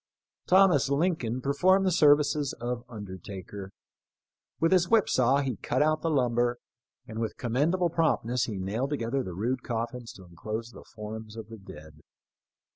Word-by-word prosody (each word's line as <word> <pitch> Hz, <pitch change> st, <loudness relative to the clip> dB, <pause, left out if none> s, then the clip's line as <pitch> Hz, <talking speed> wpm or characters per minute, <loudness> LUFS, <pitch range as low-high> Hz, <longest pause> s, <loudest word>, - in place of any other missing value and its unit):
Thomas 180 Hz, -8 st, +5 dB
Lincoln 140 Hz, -6 st, 0 dB
per 140 Hz, +2 st, -1 dB
formed 185 Hz, +6 st, +4 dB
the 185 Hz, -, +2 dB
services 145 Hz, -3 st, +3 dB
of 120 Hz, 0 st, -4 dB
undertaker. 100 Hz, -2 st, -8 dB, 0.9 s
With 165 Hz, -, +2 dB
his 180 Hz, -2 st, +3 dB
whip 225 Hz, -3 st, +4 dB
saw 130 Hz, +3 st, +3 dB
he 130 Hz, -6 st, -3 dB
cut 130 Hz, +8 st, 0 dB
out 155 Hz, 0 st, +1 dB
the 165 Hz, -, 0 dB
lumber, 120 Hz, -4 st, +1 dB, 0.5 s
and 110 Hz, 0 st, -7 dB
with 115 Hz, -1 st, -3 dB
commendable 150 Hz, +8 st, +1 dB
promptness 125 Hz, -7 st, +1 dB
he 110 Hz, -5 st, -5 dB
nailed 105 Hz, +8 st, -2 dB
together 135 Hz, -2 st, -1 dB
the 90 Hz, -8 st, -6 dB
rude 120 Hz, +6 st, -1 dB
coffins 120 Hz, 0 st, -4 dB
to 95 Hz, -, -14 dB
enclose 110 Hz, +7 st, -6 dB
the -, -, -13 dB
forms 110 Hz, 0 st, -7 dB
of 110 Hz, -1 st, -8 dB
the 115 Hz, -1 st, -10 dB
dead. 75 Hz, -5 st, -13 dB
125 Hz, 160 wpm, -28 LUFS, 110-150 Hz, 0.9 s, Thomas